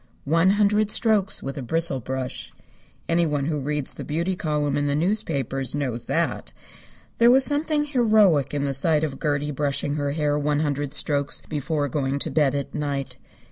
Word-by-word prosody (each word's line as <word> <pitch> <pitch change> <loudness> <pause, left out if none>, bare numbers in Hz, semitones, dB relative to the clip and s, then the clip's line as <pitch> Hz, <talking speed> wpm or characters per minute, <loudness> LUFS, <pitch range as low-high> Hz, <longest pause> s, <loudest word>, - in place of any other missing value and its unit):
One 165 +5 +3
hundred 210 0 +2
strokes 215 -3 +3
with 135 +1 -5
a - - -5
bristle 160 +1 -1
brush. 130 +1 -5 0.6
Anyone 160 -4 0
who 150 -1 -2
reads 145 0 -2
the - - -8
beauty 170 +5 -2
column 150 -4 -1
in 145 0 0
the 140 - 0
newspapers 145 - 0
knows 125 -5 -3
that. - - -1 0.7
There 235 +1 +6
was 260 +2 +6
something 295 +1 0
heroic 215 - +3
in 145 -1 -2
the 140 - -1
sight 150 +3 +2
of 140 -4 -4
Gertie 150 -1 -1
brushing 145 0 -2
her 145 -1 -2
hair 150 -1 0
one 145 0 0
hundred 145 -1 -2
strokes 145 -2 +2
before 150 0 -2
going 140 0 -2
to - - -2
bed 145 -3 +2
at 140 -1 -4
night. 140 -3 -4
150 Hz, 175 wpm, -23 LUFS, 140-170 Hz, 0.7 s, There